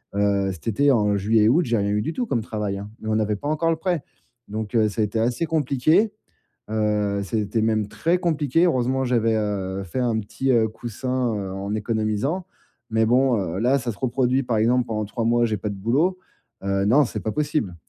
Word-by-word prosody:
heu, - - 0
heu, 100 -1 +2
cet 90 - -12
été 140 +6 +3
en 105 -5 +2
juillet, 105 +2 +3
août, 160 +9 +4
j'ai 120 -2 +1
rien 100 -1 0
eu 105 0 +1
du 135 - -2
tout 250 - -2
comme 120 - 0
travail, 105 -2 -3
hein, 100 +1 -8
mais 110 - -8
on 110 - +1
n'avait 110 -1 +1
pas 145 - -6
encore 155 +2 +1
le - - +1
prêt. 175 -3 -1 0.5
Donc, 110 +1 -4
heu, 110 -2 +4
ça 105 +2 -2
a - - +3
été 105 +2 -2
assez 120 +7 0
compliqué, 155 - +2 0.6
heu, 105 -2 0
c'était 105 +2 -1
même 110 -2 +1
très 170 +10 0
compliqué. 165 -3 +1
Heureusement 130 -3 +1
j'avais, 115 -3 +2
heu, 100 -3 -2
fait 95 +8 -4
un 120 -3 +1
petit, 130 +5 -1
heu, 115 -2 +3
coussin, 120 +2 -3
heu, 100 -2 -4
en 100 +2 -4
économisant, 110 - -1 0.4
mais 110 0 +2
bon, 125 0 +3
heu, 90 -2 -3
là, 130 +4 +3
ça 125 -2 -3
se 100 - -15
reproduit, 130 +1 +1
par 115 -3 0
exemple, 120 +3 +3
pendant 110 -2 -2
3 115 +3 -3
mois, 120 +1 +3
j'ai 110 -2 -1
pas 105 +2 -3
de - - -4
boulot. 140 - +1 0.5
Heu, 100 0 0
non 140 +8 +5
c'est 110 - -5
pas 110 +3 -3
possible. 150 - -1
115 Hz, 220 wpm, -23 LUFS, 105-130 Hz, 0.6 s, non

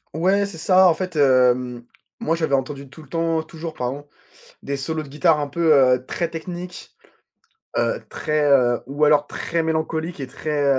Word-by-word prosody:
Ouais, 195 +5 +2
c'est 195 -5 -9
ça, 185 +3 +5
en 170 - +4
fait, 185 -2 -5
hem, 125 -3 +3 0.3
moi 165 - 0
j'avais 160 -4 +1
entendu 135 +1 -4
tout 155 +4 -13
le 145 - -19
temps, 165 0 0
toujours, 160 0 -8
pardon, 135 +4 -4 0.6
des 140 - -3
solos 155 +4 -3
de 145 - -11
guitare 150 +2 +2
un 145 - -2
peu, 160 +2 +2
heu, 125 -2 +4
très 170 - -2
techniques, 175 +2 -8 0.8
heu, - - 0
très, 150 -1 -1
heu 120 -3 +4
ou 145 +3 0
alors 150 -1 +4
très 165 +2 -2
mélancoliques 160 +1 -2
et 135 - -4
très, 145 +2 -2
155 Hz, 180 wpm, -22 LUFS, 140-165 Hz, 0.8 s, ça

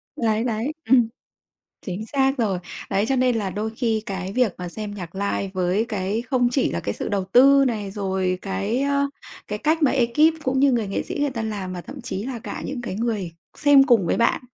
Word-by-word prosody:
Đấy, 225 -1 +1
đấy, 235 +4 -1 0.2
ừm. 245 -3 +6 0.8
Chính 195 +4 -4
xác 270 0 +1
rồi. 200 -6 +1 0.3
Đấy 200 +3 +1
cho 270 - +2
nên 250 -2 +2
là 200 -3 -1
đôi 215 +3 -3
khi 225 -4 0
cái 190 -1 -4
việc 245 -4 +1
mà 180 -1 -5
xem 210 +2 -6
nhạc 180 -3 -8
live 200 0 -2
với 185 +4 +1
cái 205 +1 -2
không 245 -1 +1
chỉ 260 +1 +1
là 85 - -2
cái 100 - -3
sự - - -4
đầu 195 -2 -1
tư 275 +7 +6
này, 210 -5 -2
rồi 190 -2 -1
cái, 200 +5 -1
ờ, 280 0 +2 0.4
cái 210 0 -3
cách 315 +4 +1
mà 285 - +5
ê 245 -3 +2
kíp 305 +7 +4
cũng 260 0 +1
như 275 -1 +5
người 230 -4 +1
nghệ 195 - -1
sĩ - - -6
người 290 -1 +1
ta 230 -3 -4
làm 205 -4 -4
mà 180 - -5
thậm 275 +9 -9
chí 235 -5 -4
là 255 -2 -4
cả - - -6
những 265 -3 -4
cái 235 - -4
người 210 -5 -2 0.2
xem 285 -2 +6
cùng 230 -9 +4
với - - +1
bạn 235 - +2
220 Hz, 230 wpm, -23 LUFS, 195-260 Hz, 0.8 s, ừm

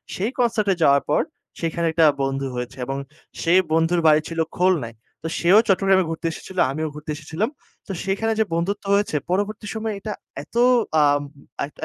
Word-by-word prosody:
সেই 210 +7 -1
কনসার্ট 230 -4 +1
এ - - -4
যাওয়ার 140 0 +5
পর - - +3 0.4
সেখানে 170 +1 -1
একটা 160 0 +4 0.2
বন্ধু 135 0 -1
হয়েছে, 125 +1 -5
এবং 135 +2 -3 0.4
সেই 175 +2 +4
বন্ধুর 165 +2 +2
বাড়ি 155 0 +6
ছিল 165 -1 -5 0.2
খুলনায়। 165 -11 +1 0.3
তো - - -2
সেও 180 +4 +5
চট্টগ্রামে 195 -1 +4
ঘুরতে 165 0 -5
এসেছিল। 185 - -10
আমিও 155 +2 -2
ঘুরতে 150 0 -7
এসেছিলাম। 160 - -3 0.4
তো - - -5
সেইখানে 210 +4 0
যে, - - +5
বন্ধুত্ব 195 +5 -1
হয়েছে 205 -6 0
পরবর্তী 205 +3 -1
সময়ে 220 -1 -3
এটা 210 +1 -4 0.3
এতো 235 - -1 0.4
আম 145 0 +3 0.4
এক 145 - -12
170 Hz, 170 wpm, -22 LUFS, 155-200 Hz, 0.4 s, বাড়ি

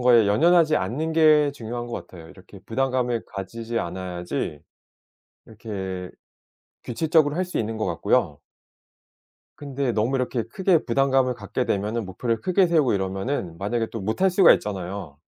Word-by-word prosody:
거에 120 -3 +5
연연하지 160 +7 +4
않는 155 +6 -2
게 155 -2 +5
중요한 120 -2 -6
것 120 - -6
같아요. 85 -3 -13
이렇게 95 +1 -15
부담감을 125 -1 -1
가지지 115 +4 -5
않아야지 90 -3 -4 0.9
이렇게 95 -5 -6 0.7
규칙적으로 150 +3 +1
할 185 - +1
수 180 - -7
있는 110 0 -2
것 110 - -2
같고요. 75 -4 0 1.2
근데 140 -3 -2
너무 115 +5 +1
이렇게 125 -2 -1
크게 185 - +2
부담감을 130 +1 +2
갖게 125 +1 -3
되면은 105 +3 -1
목표를 110 +4 -2
크게 185 0 +3
세우고 155 -8 +3
이러면은 95 -1 -2
만약에 115 +5 -1
또 115 - -5
못할 110 - +1
수가 185 0 +6
있잖아요. 95 -6 -4
115 Hz, 345 characters per minute, -24 LUFS, 95-140 Hz, 1.2 s, 수가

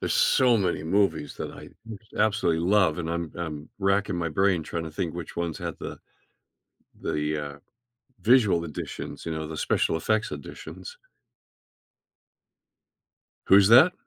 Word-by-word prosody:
there's - - -1
so 125 -2 +4
many 95 -5 0
movies 80 -4 0
that - - -5
I - - -11 0.3
just 110 +1 -22
absolutely 105 -6 +2
love, 95 -6 +3
and 80 - -3
I'm 85 -1 -3
I'm 75 -3 -5
racking 100 -1 +1
my 85 -1 -1
brain 95 +1 +2
trying 80 +1 -4
to 80 - -6
think 80 +1 -3
which 85 -1 -7
ones 85 -2 -2
had - - -5
the - - -7 1.0
the, 75 0 -1 0.2
uh, 70 - -15 0.6
visual 105 -8 +4
editions, 75 -3 -6
you 85 - -3
know, 80 0 -4
the 80 - -6
special 80 - +1
effects 110 +6 0
editions. 485 0 -9 2.5
Who's 100 0 +7
that? 130 +11 +8
85 Hz, 145 wpm, -26 LUFS, 80-105 Hz, 2.5 s, that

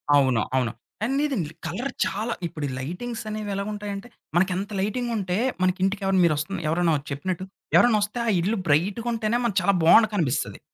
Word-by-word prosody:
అవును. 130 -5 +4
అవును. 125 -4 +1 0.3
ఆ! - - +3
లేదండి. 265 - 0 0.2
కలర్ 235 +12 -3
చాలా 220 +4 -2
ఇప్పుడు 150 -3 -5
ఈ - - -4
లైటింగ్సనేవి 215 - -5
ఎలా 200 - -1
ఉంటాయంటే 205 +1 -5 0.3
మనకి 185 +2 +3
ఎంత 195 +3 -3
లైటింగుంటే, 210 -3 -1 0.2
మనకి 185 +1 +2
ఇంటికెవరైనా 195 -1 +2
మీరొస్తున్న 155 +4 0
ఎవరన్నా 165 +1 +2 0.2
చెప్పినట్టు 175 +6 -3 0.3
ఎవరన్నొస్తే 215 -1 +4
ఆ - - +3
ఇల్లు 205 +7 0
బ్రైట్‌గుంటేనే 215 +8 +1
మనకు 210 -4 0
చాలా 200 +2 +3
బావుండ 195 +7 +8
కనిపిస్తది. 155 -10 -1
195 Hz, 150 wpm, -25 LUFS, 170-215 Hz, 0.3 s, బావుండ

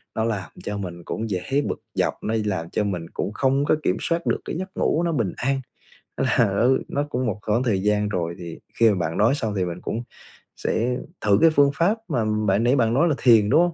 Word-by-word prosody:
nó 110 - 0
làm 110 -4 -2
cho 105 - -3
mình 90 -3 -6
cũng 110 +6 -4
dễ 90 -3 -1 0.2
bực - - -3
dọc, - - -1
nó 110 - -1
làm 95 -5 -2
cho 105 - 0
mình 90 -5 -3
cũng 105 - -3
không 135 +4 +1
có - - +3
kiểm - - +1
soát 170 0 -1
được - - +1
cái - - -4
giấc 190 +1 -5
ngủ 165 - +1
nó 170 - +1
bình 115 - -1
an. 135 +1 0 0.6
Là - - +1 0.2
nó 115 - +3 0.2
nó 145 - -1
cũng 130 -2 -1
một 105 -3 -2
khoảng 110 +4 0
thời 100 -7 0
gian 105 0 +1
rồi, 85 -4 -2
thì 85 -2 -8 0.2
khi 115 -1 +6
mà 105 - +2
bạn 80 -1 -2
nói 115 +7 +4
xong 110 -7 -2
thì 95 - +1
mình 85 0 -5
cũng 115 - -3 0.5
sẽ 125 +2 0 0.2
thử 100 -2 +4
cái 165 - +7
phương 145 -3 +4
pháp 195 +9 +2
mà 120 -8 0 0.2
bạn 100 +3 +2
nãy 125 +3 +3
bạn 115 -4 +2
nói 145 +7 +3
là 150 - +1
thiền, 110 -5 +5
đúng 160 - +5
không? 175 -1 +1
110 Hz, 245 wpm, -23 LUFS, 100-135 Hz, 0.6 s, cái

